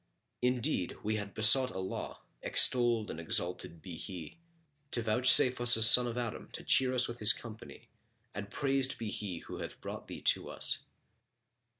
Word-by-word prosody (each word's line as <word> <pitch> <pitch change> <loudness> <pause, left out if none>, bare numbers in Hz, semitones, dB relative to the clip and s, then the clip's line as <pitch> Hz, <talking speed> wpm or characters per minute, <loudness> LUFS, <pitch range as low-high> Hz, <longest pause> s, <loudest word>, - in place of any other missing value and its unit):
Indeed, 125 - -2
we 110 +1 -2
had 100 -1 -8
besought 125 +4 +3
Allah 95 -3 -7 0.2
(extolled 120 -4 +1
and 80 - -9
exalted 85 0 -5
be 90 -4 -10
He!) 90 - -10 0.5
to 120 - -5
vouchsafe 125 +2 +4
us 120 0 +8
a 110 - +5
son 120 +2 +8
of 120 0 -6
Adam 120 -3 -6
to - - -8
cheer 130 -1 +1
us 125 0 +2
with 120 0 -9
his 110 +2 +5
company 115 -2 -12 0.5
and 100 0 -8
praised 135 0 -1
be 110 -2 -6
He 95 -5 -6
who - - -9
hath - - -9
brought - - -9
thee - - -10
to - - +1
us! - - -1
115 Hz, 170 wpm, -30 LUFS, 100-125 Hz, 0.5 s, us